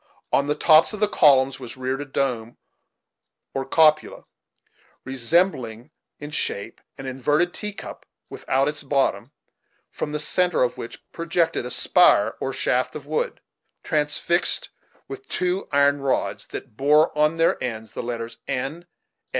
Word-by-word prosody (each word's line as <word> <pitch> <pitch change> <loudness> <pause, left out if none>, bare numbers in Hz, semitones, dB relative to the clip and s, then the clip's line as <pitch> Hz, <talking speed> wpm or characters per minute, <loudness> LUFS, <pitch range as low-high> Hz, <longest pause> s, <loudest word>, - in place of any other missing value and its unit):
On 140 - +3
the 150 - 0
tops 155 +5 +5
of 210 - -6
the 210 - +3
columns 135 -7 +4
was 125 -1 -9
reared 130 +2 -3
a - - -5
dome 125 -4 -2 1.0
or 135 - -2
cupola, 155 +1 +2 0.8
resembling 130 - 0 0.3
in 145 +1 -8
shape 105 -6 -3 0.2
an 135 - -8
inverted 145 +7 0
tea 210 -1 -4
cup 200 - -10 0.2
without 135 +1 -1
its 150 0 -2
bottom, 140 -1 0 0.6
from 150 - -4
the 150 - -2
centre 180 +1 +2
of 125 - 0
which 115 - -9
projected 170 0 -1
a - - -6
spire, - - +4
or - - -2
shaft - - 0
of - - -7
wood, 485 +1 -3 0.4
transfixed 155 +3 0 0.4
with 405 0 -9
two 180 +1 -2
iron 140 0 +3
rods, 135 -1 -1
that - - -8
bore 150 +6 +3
on 150 +2 +2
their 165 0 +2
ends 110 -3 -5
the - - -4
letters 115 -1 -6
N. 145 +7 -3
145 Hz, 145 wpm, -23 LUFS, 130-165 Hz, 1.0 s, tops